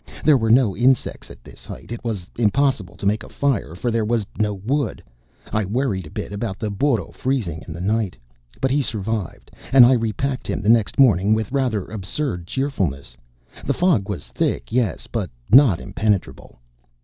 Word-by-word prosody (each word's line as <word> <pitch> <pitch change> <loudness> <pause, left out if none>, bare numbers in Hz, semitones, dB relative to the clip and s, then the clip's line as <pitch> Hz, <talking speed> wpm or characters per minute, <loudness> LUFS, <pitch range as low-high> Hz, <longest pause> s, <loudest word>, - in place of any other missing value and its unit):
There 150 - +7
were 115 -4 +1
no 115 -4 +4
insects 125 +1 +1
at - - -14
this - - -13
height. - - -10
It 120 - -6
was 105 -7 -4
impossible 115 -5 +1
to 95 - -8
make 105 +2 +1
a - - -10
fire 120 - -1
for 120 +7 -2
there 115 -1 +1
was 110 -1 0
no 105 -1 +2
wood. 125 +6 -2 0.5
I 110 - +1
worried 100 - -1
a - - -11
bit - - -6
about 100 -1 -3
the 110 -2 -3
burro 115 +1 0
freezing 105 - -2
in - - -7
the 85 +2 -6
night. 105 -1 -1 0.4
But 135 - 0
he 145 +2 +2
survived, 110 - -4 0.2
and 130 -2 +9
I 125 - +5
repacked 125 +3 -1
him - - -2
the 105 - +1
next 115 -3 +3
morning 105 -5 +5
with 110 -1 -3
rather 125 -8 0
absurd 100 - -4
cheerfulness. 90 - -2 0.5
The - - -1
fog 145 - +2
was 90 -11 -5
thick, - - -2
yes, 120 -4 0
but 105 -7 -3 0.2
not 125 - +7
impenetrable. 100 0 -2
110 Hz, 185 wpm, -21 LUFS, 100-130 Hz, 0.5 s, and